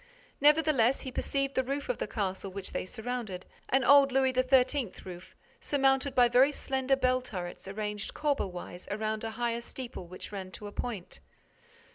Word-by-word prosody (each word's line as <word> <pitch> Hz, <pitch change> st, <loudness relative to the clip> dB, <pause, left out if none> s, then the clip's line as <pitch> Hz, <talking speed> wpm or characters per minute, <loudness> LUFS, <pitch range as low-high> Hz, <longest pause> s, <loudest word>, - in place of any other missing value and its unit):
Nevertheless, 290 Hz, -4 st, +4 dB
he 260 Hz, -, -6 dB
perceived 275 Hz, +1 st, -1 dB
the 260 Hz, -, +2 dB
roof 275 Hz, +2 st, -3 dB
of -, -, -2 dB
the -, -, -2 dB
castle 195 Hz, -2 st, -3 dB
which 195 Hz, 0 st, -6 dB
they -, -, -3 dB
surrounded, 220 Hz, -5 st, -4 dB, 0.2 s
an 265 Hz, 0 st, +3 dB
old 280 Hz, +1 st, +7 dB
Louis 265 Hz, 0 st, +3 dB
XIII. 255 Hz, -2 st, +3 dB
roof, 180 Hz, 0 st, -10 dB, 0.2 s
surmounted 270 Hz, -1 st, +2 dB
by 245 Hz, -1 st, +6 dB
very 255 Hz, +4 st, +5 dB
slender 265 Hz, -1 st, 0 dB
bell 255 Hz, -1 st, +2 dB
turrets 180 Hz, -7 st, -6 dB
arranged 210 Hz, +1 st, -4 dB
corbel 290 Hz, -9 st, 0 dB
wise 175 Hz, 0 st, -8 dB
around 215 Hz, +1 st, -2 dB
a 225 Hz, -, -2 dB
higher 235 Hz, -1 st, -1 dB
steeple 235 Hz, -7 st, -7 dB
which 185 Hz, +3 st, -9 dB
ran 190 Hz, -2 st, -5 dB
to 210 Hz, -, -8 dB
a 205 Hz, -, -6 dB
point. 210 Hz, -5 st, -5 dB
245 Hz, 170 wpm, -30 LUFS, 205-270 Hz, 0.2 s, old